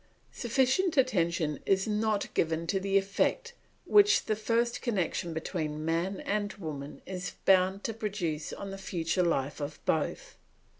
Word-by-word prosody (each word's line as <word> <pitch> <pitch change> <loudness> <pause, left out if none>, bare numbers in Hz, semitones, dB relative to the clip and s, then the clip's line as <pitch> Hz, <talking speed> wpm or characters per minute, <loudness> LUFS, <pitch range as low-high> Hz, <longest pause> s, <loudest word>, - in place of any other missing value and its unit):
Sufficient 270 - +1
attention 170 - +2
is 190 +1 +2
not 215 -1 0
given 165 0 0
to 195 +3 0
the 195 +1 +2
effect 330 - 0 0.3
which 410 0 +5
the 215 - +1
first 230 +2 0
connection 185 -7 -1
between 155 -2 -3
man 170 +4 -1
and 205 0 -1
woman 150 -6 -7
is 180 -1 -5
bound 190 +1 +4
to 225 - -2
produce 190 -8 -3
on 200 -1 -6
the 195 - -7
future 180 -1 -1
life 150 -4 0
of 145 +1 -5
both. 155 -2 -1
195 Hz, 145 wpm, -30 LUFS, 165-215 Hz, 0.3 s, which